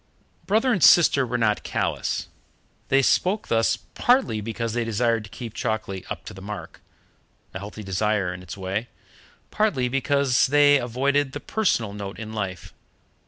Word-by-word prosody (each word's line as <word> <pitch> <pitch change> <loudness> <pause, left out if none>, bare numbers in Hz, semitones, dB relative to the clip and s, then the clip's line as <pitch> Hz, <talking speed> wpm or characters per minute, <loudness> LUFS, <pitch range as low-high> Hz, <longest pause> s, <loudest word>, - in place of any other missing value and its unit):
Brother 225 +5 +3
and 190 - 0
sister 140 -6 +6
were 120 +1 -1
not 105 -3 +1
callous. - - -2 0.6
They 135 0 +3
spoke 195 +10 +1
thus, 115 0 +2
partly 245 - +1
because 115 +1 -3
they 120 0 0
desired 115 0 0
to - - -13
keep 115 +2 -8
Chalkeley 110 -5 -3
up - - -6
to - - -8
the 95 - -11
mark 105 +1 -8 0.7
a 95 - -5
healthy 105 +2 -8
desire 95 -1 0
in 90 - -9
its 90 +1 -9
way 95 +5 -3 0.6
partly 150 -13 +1
because 135 0 +2
they 145 +1 +5
avoided 135 +3 0
the - - -4
personal 120 - 0
note 100 -2 -7
in 110 0 -7
life. 95 -4 -5
115 Hz, 160 wpm, -24 LUFS, 105-140 Hz, 0.7 s, sister